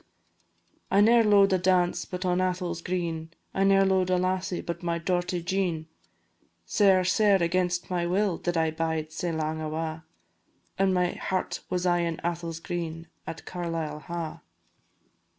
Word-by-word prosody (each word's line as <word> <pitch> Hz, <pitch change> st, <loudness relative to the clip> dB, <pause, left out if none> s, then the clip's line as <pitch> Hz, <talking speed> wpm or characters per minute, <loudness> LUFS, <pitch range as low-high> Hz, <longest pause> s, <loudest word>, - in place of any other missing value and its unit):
"I 195 Hz, -, +3 dB
ne'er 230 Hz, +3 st, +6 dB
lo'ed 200 Hz, -2 st, +5 dB
a 185 Hz, -, +3 dB
dance 180 Hz, -1 st, +2 dB
but 180 Hz, 0 st, -5 dB
on 180 Hz, 0 st, +2 dB
Atholl's 180 Hz, -2 st, -1 dB
green, 165 Hz, -3 st, -3 dB, 0.2 s
I 195 Hz, -, +1 dB
ne'er 195 Hz, 0 st, +5 dB
lo'ed 190 Hz, -1 st, +2 dB
a 185 Hz, -, +3 dB
lassie 185 Hz, 0 st, -1 dB
but 170 Hz, 0 st, -5 dB
my 170 Hz, -1 st, -1 dB
dorty 175 Hz, 0 st, -1 dB
Jean, 175 Hz, -4 st, -1 dB, 0.8 s
Sair, 195 Hz, -3 st, +4 dB
sair 195 Hz, 0 st, +4 dB
against 175 Hz, +1 st, 0 dB
my 175 Hz, -1 st, 0 dB
will 190 Hz, 0 st, +1 dB
did 175 Hz, -1 st, -1 dB
I 160 Hz, -1 st, +2 dB
bide 160 Hz, -1 st, -2 dB
sae 170 Hz, +2 st, -2 dB
lang 160 Hz, 0 st, -2 dB
awa', 155 Hz, +1 st, -3 dB, 0.8 s
And 195 Hz, 0 st, +3 dB
my 180 Hz, -1 st, +2 dB
heart 185 Hz, -1 st, -2 dB
was 180 Hz, 0 st, -1 dB
aye 175 Hz, -1 st, +3 dB
in 170 Hz, -1 st, -1 dB
Atholl's 170 Hz, -1 st, -3 dB
green 165 Hz, -1 st, -5 dB, 0.2 s
at -, -, -7 dB
Carlisle 165 Hz, -4 st, -4 dB
Ha'." 170 Hz, -2 st, -5 dB
175 Hz, 155 wpm, -27 LUFS, 165-185 Hz, 0.8 s, ne'er